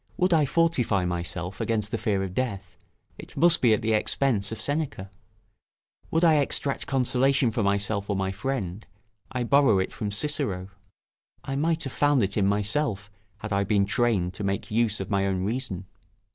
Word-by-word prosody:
Would 180 0 +2
I 155 -3 +4
fortify 135 - +1
myself 90 +1 -3
against 110 -2 -1
the 115 - -1
fear 100 -3 0
of 95 -2 -5
death, 100 -5 -3 0.4
it - - -11
must 170 +3 +4
be 120 - +5
at 110 - +2
the 110 0 +1
expense 110 -2 +1
of 110 - -5
Seneca: 145 -10 -3 1.0
would 165 +2 +1
I 160 -3 +6
extract 140 -1 -1
consolation 135 -1 +2
for 115 +1 -1
myself 100 0 0
or 100 - 0
my 95 0 -1
friend, 105 -3 -4 0.4
I 125 -2 -2
borrow 135 -4 +4
it 95 - -1
from 105 -3 -3
Cicero. 100 -5 -2 0.7
I 135 - -4
might 160 +3 0
have 135 - -5
found 145 -4 +3
it 100 +1 -1
in 100 -2 +2
myself, 105 +1 -1 0.3
had 105 -1 -4
I 100 0 +2
been 100 0 +2
trained 105 -4 +1
to 105 - -6
make 100 +1 -2
use 110 -1 +1
of 95 - -5
my 100 -1 +1
own 95 -1 -1
reason. 105 -4 -3
110 Hz, 180 wpm, -26 LUFS, 100-135 Hz, 1.0 s, I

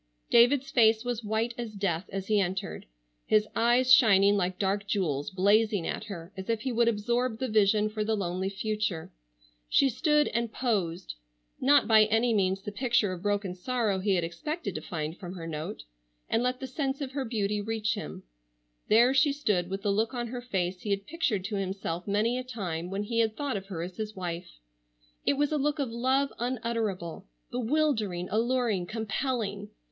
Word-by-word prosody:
David's 255 +3 +5
face 225 -2 +4
was 240 -2 -2
white 220 +3 -1
as 230 -3 -4
death 185 -3 -2
as 195 -1 -4
he 210 0 +2
entered, 190 +1 -3 0.4
his 215 0 +3
eyes 245 +2 +4
shining 200 -5 +6
like 185 -2 -1
dark 200 +1 -1
jewels 150 -8 -1
blazing 200 0 +2
at - - -3
her 185 -3 -8
as 190 +1 -7
if 225 -2 0
he 260 - -2
would 235 0 +2
absorb 235 +2 0
the 260 - -2
vision 215 -1 +3
for 215 0 -2
the 220 +1 0
lonely 185 0 -2
future. 205 -4 -2 0.6
She 275 - +4
stood 300 +4 +2
and 235 0 -1
posed,—not 170 - 0
by 220 -1 +7
any 225 +2 +2
means 195 -2 +1
the 210 - -5
picture 235 -3 +1
of 175 - -7
broken 205 -2 -1
sorrow 215 0 -1
he 195 0 +1
had 175 - +1
expected 200 - -4
to 155 - -4
find 155 0 -5
from 180 -1 -7
her 170 -2 -7
note,—and 105 - -5
let 250 +1 0
the 265 - -5
sense 270 +1 -2
of 275 -3 -4
her 275 0 -2
beauty 210 -3 -1
reach 220 0 -1
him. 75 - -7 0.6
There 235 +4 +5
she 275 +2 +4
stood 205 -11 0
with 195 +1 -4
the 205 - +2
look 220 +5 0
on 240 -1 -2
her 245 +1 -5
face 185 -6 -2
he 210 - -5
had 200 0 -1
pictured 270 - -1
to 205 0 -2
himself 190 -2 -3
many 220 +5 +1
a - - -4
time 180 -9 -4
when 195 +2 -2
he 230 +2 -1
had 220 -1 +1
thought 285 -5 -2
of 195 -1 -5
her 170 -4 -4
as 180 +1 -7
his 215 -1 -4
wife. 175 -1 -5 0.8
It - - +5
was 290 +1 0
a 305 - +1
look 295 +2 0
of 275 -5 -2
love 260 +4 +1
unutterable, 225 - -3 0.2
bewildering, 235 - 0
alluring, 230 -5 +1
compelling. 220 -1 -2
215 Hz, 185 wpm, -28 LUFS, 190-240 Hz, 0.8 s, by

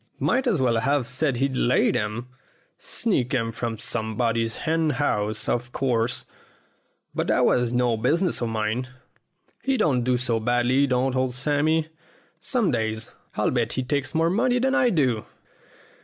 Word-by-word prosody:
Might 265 0 +1
as 205 -10 +2
well 120 -3 +2
have 140 +2 +1
said 135 +1 0
he'd 135 +1 0
laid 125 0 +2
'em. 110 +3 -2 0.5
Sneaked 140 - -1
'em 115 -2 0
from 115 0 -4
somebody's 115 +1 -1
hen 160 0 +1
house, 110 -6 -1
of 120 +1 -1
course, 125 -3 0 0.9
but - - -2
that - - +3
was 125 -1 +2
no 120 -1 +2
business 160 - +1
of 120 - -1
mine. 110 +3 -1 0.7
He 270 -1 0
don't 130 - +2
do 125 0 +2
so 120 -2 0
badly, 120 +4 +2
don't 130 0 +1
old 130 -1 0
Sammy. 155 +4 +1 0.5
Some 230 +1 0
days 110 -1 -2 0.2
I'll 105 - +1
bet 120 -2 0
he 130 - -1
takes 140 +1 -2
more 165 +1 +2
money 245 +5 +2
than 265 +2 +1
I 280 -4 +4
do." 130 - +1
125 Hz, 155 wpm, -24 LUFS, 115-150 Hz, 0.9 s, I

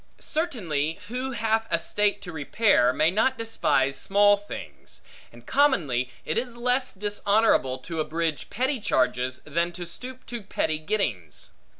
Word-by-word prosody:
Certainly, 175 - -2
who 255 +2 -3
hath 225 -1 0
a 170 - +2
state 205 +3 0
to 175 - -6
repair, 160 - +3
may 155 +5 +2
not 240 +7 +2
despise 140 -12 +1
small 205 +4 +4
things; 70 - -10 0.3
and 120 0 -16
commonly 165 - +2 0.2
it - - 0
is 240 -1 -6
less 250 +2 +1
dishonorable, 205 - +2
to 160 +5 -6
abridge 160 -1 -2
petty 260 +3 -1
charges, 130 - 0
than 170 +3 0
to 175 0 -6
stoop 255 +9 -10
to 240 -2 -5
petty 155 -5 -1
gettings. 155 - -3
195 Hz, 140 wpm, -26 LUFS, 145-230 Hz, 0.3 s, small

